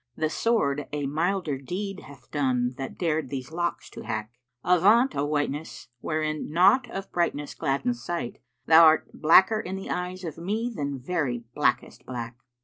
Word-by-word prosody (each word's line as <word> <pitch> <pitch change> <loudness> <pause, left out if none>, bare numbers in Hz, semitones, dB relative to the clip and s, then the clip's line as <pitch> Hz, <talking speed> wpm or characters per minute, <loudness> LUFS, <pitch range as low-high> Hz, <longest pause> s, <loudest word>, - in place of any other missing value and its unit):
* - - -48
The 155 0 -1
sword 145 -12 0
a 145 -1 -2
milder 160 0 -1
deed 190 +7 -5
hath 135 -3 -15
done 125 -4 0
that 135 - -5
dared 160 -5 -1
these 130 +1 -5
locks 175 +1 -2
to - - -9
hack. 110 +1 -4 0.3
Avaunt, 205 +9 +4
O 140 - 0
Whiteness,[FN#463] 145 -4 -3
wherein 155 -1 -2
naught 200 +10 +4
of 195 -3 -6
brightness 150 -4 -1
gladdens 125 -3 -1
sight 170 -3 -4
* - - -50
Thou 160 0 +8
'rt 155 - 0
blacker 190 +7 +6
in 190 -2 -5
the 195 - -6
eyes 180 +1 -4
of 165 -2 -6
me 220 +7 -2
than 140 -3 -3
very 130 -4 -2
blackest - - 0
black!' 120 -2 -5
155 Hz, 170 wpm, -26 LUFS, 135-180 Hz, 0.3 s, Thou